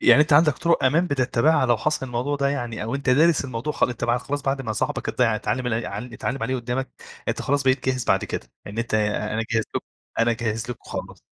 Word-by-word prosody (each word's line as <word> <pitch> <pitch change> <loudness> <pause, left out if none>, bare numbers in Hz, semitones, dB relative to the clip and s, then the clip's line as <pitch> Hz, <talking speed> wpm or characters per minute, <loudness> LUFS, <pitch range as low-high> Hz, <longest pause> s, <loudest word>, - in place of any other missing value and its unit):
يعني 150 - +7
أنت 155 -1 -1
عَندك 150 0 +6
طُرُق 170 -5 +2
أمان 160 +7 +3
بتّتبعها 130 0 +2
لو 120 -1 +4
حصَل 140 +3 -1
الموضوع 125 +4 -1
ده 140 0 +1
يعني 120 -6 -3
أو 115 +5 -3
أنت 140 -2 0
دارِس 155 +2 +4
الموضوع 130 +3 -3
خ - - +2 0.3
خلاص 140 +3 -4
بعد 135 0 -1
ما 110 -3 -2
صاحبك - - -2
اتض 125 - 0
اتعلّم 120 +2 0
ال 115 -1 -1
ع 100 - -4
اتعلّم 125 +3 -4
عليه 130 0 0
قُدّامك، 125 +2 -3 0.4
أنت - - -1
خلاص 140 0 +1
بقيت 130 -1 +2
جاهز 130 -1 0
بعد - - +2
كد، - - -4
ه - - -28 0.2
يعني 105 +3 -3
أنت 115 - -3
أنا 105 +1 0
جاهز 115 -1 +1
لكم، - - -3 0.3
أنا 115 +1 +3
جاهز 115 0 -2
لكم 120 - -8
خالص. - - -6
125 Hz, 230 wpm, -24 LUFS, 115-140 Hz, 0.4 s, يعني